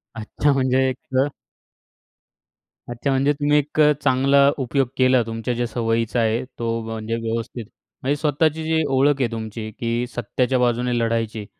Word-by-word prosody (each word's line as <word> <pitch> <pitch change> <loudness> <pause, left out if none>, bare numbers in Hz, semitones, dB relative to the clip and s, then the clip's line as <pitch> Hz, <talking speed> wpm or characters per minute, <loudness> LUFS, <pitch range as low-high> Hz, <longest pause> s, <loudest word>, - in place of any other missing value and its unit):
अच्छा 115 +6 0
म्हणजे 130 0 +2
एक 130 - -4 1.9
अच्छा. 120 +3 -3
म्हणजे 135 +2 +2
तुम्ही 145 +1 +2
एक 150 +1 -2 0.2
चांगला 140 +1 +4
उपयोग 135 0 0
केला 130 -1 +4
तुमच्या 115 +2 -3
ज्या 120 0 -1
सवयीचा 115 0 -1
आहे. 115 +2 +1 0.2
तो 115 0 -1
म्हणजे 110 0 -4
व्यवस्थित, 115 0 -4 0.4
म्हणजे 140 +2 0
स्वतःची 155 +1 +1
जी 160 0 +1
ओळख 135 +1 +2
आहे 120 - 0
तुमची, 110 -1 -5
की 120 +1 -2
सत्याच्या 125 +3 0
बाजूने 120 0 +1
लढायची, 115 -2 -1
125 Hz, 140 wpm, -22 LUFS, 115-135 Hz, 1.9 s, चांगला